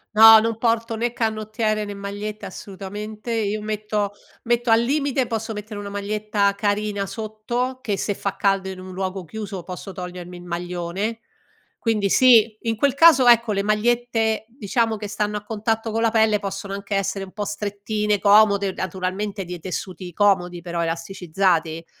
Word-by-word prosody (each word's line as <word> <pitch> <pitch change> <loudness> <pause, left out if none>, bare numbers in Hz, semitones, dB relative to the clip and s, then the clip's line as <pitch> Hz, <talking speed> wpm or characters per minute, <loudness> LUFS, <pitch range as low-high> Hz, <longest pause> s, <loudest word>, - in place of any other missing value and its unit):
No, 220 +1 +10
non 225 0 -1
porto 230 0 0
né 235 +2 -1
canottiere, 215 -1 -1
né 205 - -6
magliette 205 +1 -6
assolutamente. 210 +4 -7
Io 215 -2 -1
metto 210 -1 -2 0.3
metto 240 +1 +1
al 225 +1 +6
limite 275 0 0
posso 225 -1 -3
mettere 210 0 -7
una 205 0 -6
maglietta 205 0 0
carina 205 -1 -1
sotto, 225 +5 -3
che 210 -6 -2
se 205 +1 -1
fa 200 0 -3
caldo 195 -1 +1
in 190 -1 -7
un 185 0 -9
luogo 190 0 -4
chiuso 200 +2 -6
posso 185 +2 -7
togliermi 180 -1 -7
il 175 - -11
maglione, 175 +5 -3 0.6
quindi 215 -3 0
sì, 230 -2 +6
in 225 -1 -1
quel 280 +3 +2
caso 290 -4 +7
ecco 235 -2 +6
le 200 -1 0
magliette 225 +1 +1
diciamo 225 -1 0
che 210 0 -5
stanno 210 0 -1
a 205 - -7
contatto 225 +1 -2
con 225 +1 -1
la 230 - +3
pelle 220 -2 +3
possono 195 0 -5
anche 200 0 -4
essere 195 0 -1
un 185 - -14
po' 205 +1 -4
strettine, 205 0 -2
comode, 200 -1 +5
naturalmente 190 +3 -3
dei 175 0 -6
tessuti 185 +1 -6
comodi 180 -3 +2
però, 170 0 -3
elasticizzati; 165 -1 -1
210 Hz, 165 wpm, -22 LUFS, 195-225 Hz, 0.6 s, No